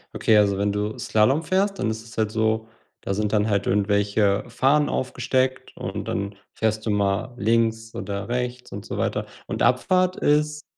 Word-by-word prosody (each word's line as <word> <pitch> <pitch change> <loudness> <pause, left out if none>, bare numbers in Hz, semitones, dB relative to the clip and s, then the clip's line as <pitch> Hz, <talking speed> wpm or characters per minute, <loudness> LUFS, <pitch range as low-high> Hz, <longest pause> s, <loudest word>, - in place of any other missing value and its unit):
Okay, 110 - +4
also 100 -2 +3
wenn 100 +1 +1
du 105 +1 -2
Slalom 130 +9 +2
fährst, 195 +4 +1
dann 110 - 0
ist 110 0 -6
es 115 +1 -14
halt 110 -1 +1
so, 110 0 0 0.3
da 100 - -2
sind 105 +1 -1
dann 105 0 +2
halt 100 -1 0
irgendwelche 100 0 +2
Fahnen 140 +5 +2
aufgesteckt 130 0 -1
und 95 +1 -5
dann 100 +1 -3 0.2
fährst 110 -1 -1
du - - +1
mal 100 +4 0
links 115 0 +1
oder 100 0 -4
rechts 125 +1 -3
und 100 +1 -7
so - - -5
weiter, - - -1 0.2
und - - -4
Abfahrt 185 +8 +3
ist 150 0 +1
110 Hz, 180 wpm, -24 LUFS, 105-130 Hz, 0.3 s, Okay